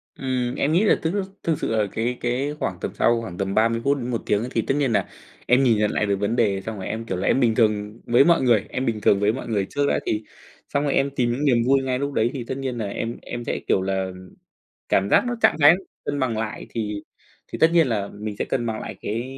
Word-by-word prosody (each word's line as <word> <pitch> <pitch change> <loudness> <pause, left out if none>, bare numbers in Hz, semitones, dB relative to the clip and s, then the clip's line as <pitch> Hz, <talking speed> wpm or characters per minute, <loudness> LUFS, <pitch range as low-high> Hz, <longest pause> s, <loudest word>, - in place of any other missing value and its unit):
Ừm, 125 -2 -2
em 145 - 0
nghĩ 175 +6 +3
là 215 - +5
thức 160 +2 -1 0.3
thực 165 -3 0
sự - - -1
là 105 -1 +2
cái 120 +2 -2
cái 130 +4 -1
khoảng - - -3
tầm - - -3
sau 115 0 +2
khoảng 90 -6 -7
tầm 95 0 -2
30 115 +1 +2
phút 140 +1 +2
đến 125 -2 -4
1 120 -2 -2
tiếng 105 +1 +1
thì 115 - +1
tất 135 - -1
nhiên 140 -4 +1
nà 105 - +1 0.4
em 125 +3 +4
nhìn 120 -4 +4
nhận 105 0 +1
lại - - 0
được 100 -1 +1
vấn 100 +3 0
đề, 100 -5 +1
xong 110 +2 -6
rồi 95 - -5
em, 115 +1 -4
kiểu 95 -4 -3
là, 90 - -2
em - - +3
bình 115 -4 +3
thường 105 -1 +1
với 120 +3 +5
mọi 170 -1 +4
người, 120 -6 +3
em 130 - -2
bình 110 -3 -1
thường 100 - +4
với 105 +2 +2
mọi 130 - -6
người 105 -4 0
trước 145 0 0
đã. - - +1
Thì 110 0 -1 0.5
xong 140 - 0
rồi 145 - 0
em 135 +1 +2
tìm 120 -3 +1
những 135 +5 -1
niềm 130 -4 +4
vui 135 0 +4
ngay 130 -1 -1
lúc 140 0 -2
đấy, 115 -1 +2
thì 130 -4 -4
tất 130 - -3
nhiên 130 -3 -3
nà 110 - -2
em 115 +3 -4
em 120 - -6
sẽ, - - -2
kiểu - - +3
là, 95 0 -1 0.8
cảm 100 +1 +2
giác - - +5
nó 245 - -1
trạng - - +5
thái 145 +3 +9 0.3
cân 145 - -2
bằng 125 -5 0
lại 110 +1 -4
thì 105 -2 -4 0.5
thì - - -4
tất 160 - +5
nhiên 165 -5 +5
là 105 -4 -1
mình 105 -1 -4
sẽ - - 0
cân 120 - -1
bằng 110 -1 -2
lại - - -7
cái 115 +3 -2
120 Hz, 275 wpm, -23 LUFS, 105-135 Hz, 0.8 s, thái